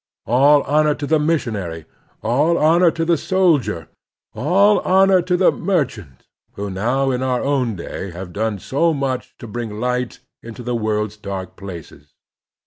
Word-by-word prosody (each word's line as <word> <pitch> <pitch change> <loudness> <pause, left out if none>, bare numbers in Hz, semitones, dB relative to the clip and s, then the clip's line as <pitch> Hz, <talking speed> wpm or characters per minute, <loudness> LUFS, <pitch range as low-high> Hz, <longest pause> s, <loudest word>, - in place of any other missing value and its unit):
All 140 +5 +4
honor 150 +1 +2
to 145 - -5
the 155 +2 +2
missionary, 105 - -2 0.4
all 145 +9 +2
honor 170 +3 +4
to 165 +1 -2
the 170 0 +2
sol 180 -1 +3
dier, 105 - -5 0.5
all 195 +8 +3
honor 190 0 +4
to 180 +1 0
the 185 - +4
merchant 125 - -3 0.3
who 100 0 -5
now 125 +8 0
in 125 0 -2
our 130 -1 0
own 130 -6 0
day 95 +2 -6
have 90 0 -8
done 110 0 -1
so 155 - 0
much 135 -2 -3
to - - -10
bring 110 -1 -5
light 125 0 -2 0.2
into 115 +2 -9
the 125 0 -2
world's 105 -2 -2
dark 95 -3 -6
places. 85 -6 -11
125 Hz, 160 wpm, -20 LUFS, 105-155 Hz, 0.5 s, All